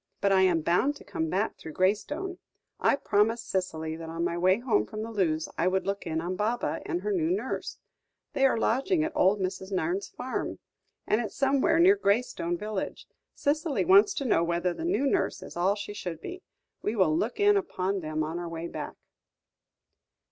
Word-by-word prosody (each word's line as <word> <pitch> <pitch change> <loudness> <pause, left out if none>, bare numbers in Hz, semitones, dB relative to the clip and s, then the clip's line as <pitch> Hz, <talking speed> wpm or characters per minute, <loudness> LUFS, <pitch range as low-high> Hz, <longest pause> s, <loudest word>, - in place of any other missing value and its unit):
But 200 0 +2
I 190 -1 +5
am 180 -3 +3
bound 180 - +2
to - - -13
come 160 0 -3
back 200 +6 -1
through 160 - -8
Graystone. 290 - 0 0.4
I - - +4
promised 225 -1 +1
Cicely 160 -4 -2
that 165 0 -7
on 165 +1 -3
my 170 0 0
way 185 +2 +3
home 235 - +1
from 215 0 -5
Lewes, 180 -8 0
I 170 - +3
would 190 0 +1
look 200 -2 -3
in 160 -1 -1
on 180 +2 -3
Baba 220 +5 -1
and 345 +1 -1
her 420 - -1
new 335 -5 +1
nurse. 375 +3 -2 0.6
They 270 0 +4
are 260 - +1
lodging 275 - +1
at 320 - -1
old 205 -9 +3
Mrs. 190 +1 -3
Nairne's 185 +1 -1
farm, 255 +1 -4 0.5
and 215 - +2
it's 215 -4 -5
somewhere 275 +3 +3
near 365 +4 +7
Graystone 200 - 0
village. 210 0 -4 0.3
Cicely 300 0 0
wants 400 +2 +6
to 275 - -2
know 170 -9 +3
whether 170 +1 0
the 325 - -5
new 345 -5 +1
nurse 275 - 0
is - - -10
all 185 +4 +2
she 205 0 -6
should 175 -6 -5
be; 365 - -7 0.4
we 215 - -1
will 180 -7 +3
look 220 - -1
in 410 0 +5
upon 200 - -1
them 155 -2 -2
on 160 +3 -3
our 175 -1 -5
way 165 0 -5
back." - - -6
200 Hz, 195 wpm, -28 LUFS, 175-275 Hz, 0.6 s, near